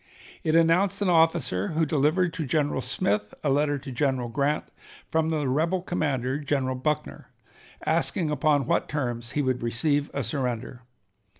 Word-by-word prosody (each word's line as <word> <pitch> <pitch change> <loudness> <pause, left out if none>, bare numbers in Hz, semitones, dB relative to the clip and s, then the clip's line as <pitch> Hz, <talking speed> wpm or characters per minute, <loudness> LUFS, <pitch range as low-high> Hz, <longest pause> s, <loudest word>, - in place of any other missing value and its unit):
It 160 0 +1
announced 175 +4 +3
an 190 - +1
officer, 160 - +2
who 160 - +3
delivered 155 +4 +2
to 165 - -3
General 145 -2 0
Smith 105 -3 -1
a 145 - +2
letter 145 +1 +2
to 135 0 -8
General 130 -1 0
Grant 140 +5 0 0.5
from 160 0 +1
the 150 -3 0
rebel 165 +7 0
commander, 140 -6 -1
General 135 -3 -1
Buckner, 140 +4 -3 0.6
asking 165 0 +1
upon 145 -1 +2
what - - 0
terms 120 -4 -3
he 145 - +1
would 130 -1 0
receive 145 +5 0
a 140 - -2
surrender. 125 -1 -3
145 Hz, 155 wpm, -26 LUFS, 130-160 Hz, 0.6 s, announced